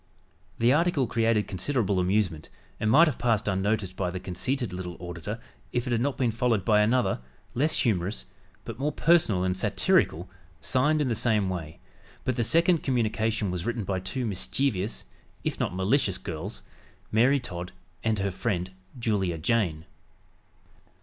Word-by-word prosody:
The 120 +2 +4
article 160 -3 +2
created 115 -2 +1
considerable 100 0 0
amusement 90 -4 0 0.3
and 110 - +1
might 160 +9 +7
have 145 - -2
passed 115 -4 +1
unnoticed 100 -1 0
by 95 -2 -1
the 90 +1 -4
conceited 95 +5 -2
little 90 -2 -5
auditor 90 +5 -6 0.3
if 120 0 -1
it 125 - -3
had 115 -1 +1
not 140 +1 0
been 125 -3 +1
followed 115 -4 +1
by 105 -2 +5
another, 120 +4 +2 0.3
less 150 +6 +1
humorous, 100 -4 0 0.4
but 115 - -7
more 145 +2 0
personal 150 - +3
and 90 0 0
satirical, 90 -2 +2 0.3
signed 145 - +2
in - - -1
the 120 - +1
same 110 -3 +1
way, 80 -4 -5 0.5
but 130 - 0
the 120 - +1
second 165 +6 +3
communication 110 -4 0
was 90 -2 -3
written 120 -1 -2
by 95 -1 -1
two 95 +7 -3
mischievous 105 +1 0 0.4
(if - - -2
not - - -1
malicious) 95 +1 +1
girls 85 +6 -6 0.5
Mary 125 +6 +4
Todd 90 -7 -6 0.3
and 110 -1 +1
her 100 0 -1
friend, 95 -1 -2 0.3
Julia 100 -7 0
Jayne. 80 -4 0
110 Hz, 155 wpm, -27 LUFS, 95-125 Hz, 0.5 s, might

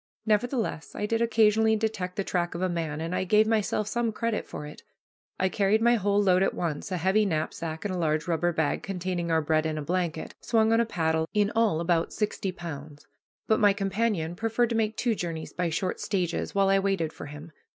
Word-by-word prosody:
Nevertheless, 220 - -1
I 210 - -2
did 225 +2 0
occasionally 220 -1 +4
detect 210 -4 -2
the 195 - -1
track 175 -2 -1
of 170 - -4
a - - +3
man, 165 -4 -3
and 165 +2 -3
I - - 0
gave 210 +3 +4
myself 215 -1 0
some 235 +1 0
credit 230 0 -2
for 150 - -7
it. 150 - -10 0.6
I 190 - +3
carried 200 +2 +2
my 235 +1 +4
whole 205 -2 +2
load 185 -2 +4
at 195 - +1
once, 170 +3 -3
a 185 - 0
heavy 190 +5 +3
knapsack, 160 -1 -3
and 200 - -1
a - - -2
large 155 -1 0
rubber 175 0 +1
bag 160 -3 0
containing 180 -2 -3
our 160 -1 +2
bread 155 +1 +1
and 155 -1 -3
a 150 - -3
blanket, 170 -1 -2
swung 225 -1 +2
on 225 - +4
a 235 - +2
paddle, 160 -4 0
in 205 0 +3
all 225 -8 +2
about 170 -1 0
sixty 210 -2 -2
pounds; 155 -5 -8 0.4
but 220 - +3
my 205 -2 +5
companion 195 -4 -1
preferred 225 +4 0
to - - 0
make 220 -1 0
two 240 -2 +1
journeys 165 -5 -5
by 175 -1 -1
short 180 +3 -2
stages 180 -3 -2
while 195 -1 +3
I 195 0 +4
waited 195 -5 0
for - - -8
him. 150 +3 -10
185 Hz, 215 wpm, -27 LUFS, 165-215 Hz, 0.6 s, my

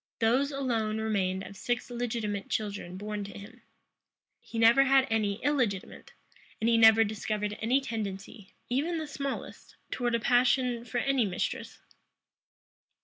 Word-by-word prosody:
Those 250 +5 +2
alone 230 -6 -1
remained 195 -4 -1
of 200 - -10
six 245 +5 -3
legitimate 225 -4 -3
children 200 -4 -3
born 210 +1 -4
to 200 - -9
him. 230 +5 -12 0.8
He 230 - -9
never 230 +4 +6
had 270 0 +5
any 210 -3 +1
illegitimate; 250 -9 -1 0.5
and 225 - 0
he 230 - +4
never 225 0 +7
discovered 210 -1 -3
any 245 +5 +3
tendency, 210 -3 -6
even 300 +8 0
the 315 - -3
smallest, 280 -2 -6 0.2
towards 240 -2 0
a - - +1
passion 245 0 +2
for 240 +1 -4
any 265 -1 +2
mistress. 180 - -3
225 Hz, 140 wpm, -29 LUFS, 210-250 Hz, 0.8 s, never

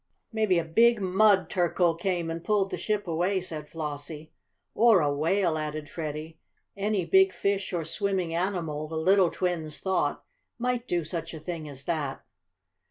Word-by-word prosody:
"Maybe 215 -5 +2
a 170 - +1
big 230 +8 +4
mud 195 +1 +4
turkle 175 -1 +2
came 170 -1 -2
and 165 0 -5
pulled 205 -3 +1
the - - -2
ship 210 -3 -2
away," 175 +4 +1
said 155 -5 -5
Flossie. 150 0 -5 0.4
"Or 225 -4 +5
a 145 -3 +1
whale," 165 +2 +1
added 150 0 -4
Freddie. 155 0 -6 0.4
Any 200 -2 0
big 385 0 +5
fish 200 -1 -1
or 170 -3 -2
swimming 190 -1 -1
animal, 165 -4 -2
the 160 +1 -5
little 185 +2 +4
twins 165 -5 -2
thought, 185 -6 0 0.3
might 245 0 -1
do 175 -1 0
such 165 +1 -5
a - - -7
thing 155 -1 -6
as 135 -1 -8
that. 145 -4 -3
175 Hz, 165 wpm, -27 LUFS, 155-195 Hz, 0.4 s, Or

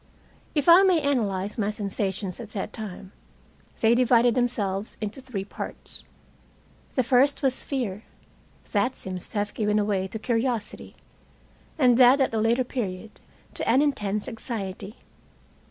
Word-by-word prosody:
If 290 -2 0
I 345 +2 +9
may 375 -4 +4
analyze 210 -8 -1
my 205 -1 +1
sensations 195 -2 -3
at 230 -3 -8
that 195 - -4
time, 195 -3 -8 0.7
they 225 +1 +5
divided 240 -1 +4
themselves 215 -5 -1
into 215 +5 -5
three 235 -7 -5
parts. - - -7 0.9
The 255 - +3
first 270 +4 +3
was 265 -2 0
fear. 230 -8 -3 0.7
That 210 +5 +1
seems 185 -1 -6
to - - -7
have 205 0 -1
given 210 -1 +1
away 205 -2 0
to 205 - -6
curiosity, 230 0 -2 0.8
and 250 -4 +4
that 255 +2 +7
at 265 - +1
a 220 - +1
later 235 +3 +2
period, 215 -5 -5 0.3
to - - -3
an 260 +5 +5
intense 210 -8 -1
anxiety. 210 -3 -6
225 Hz, 140 wpm, -26 LUFS, 200-255 Hz, 0.9 s, I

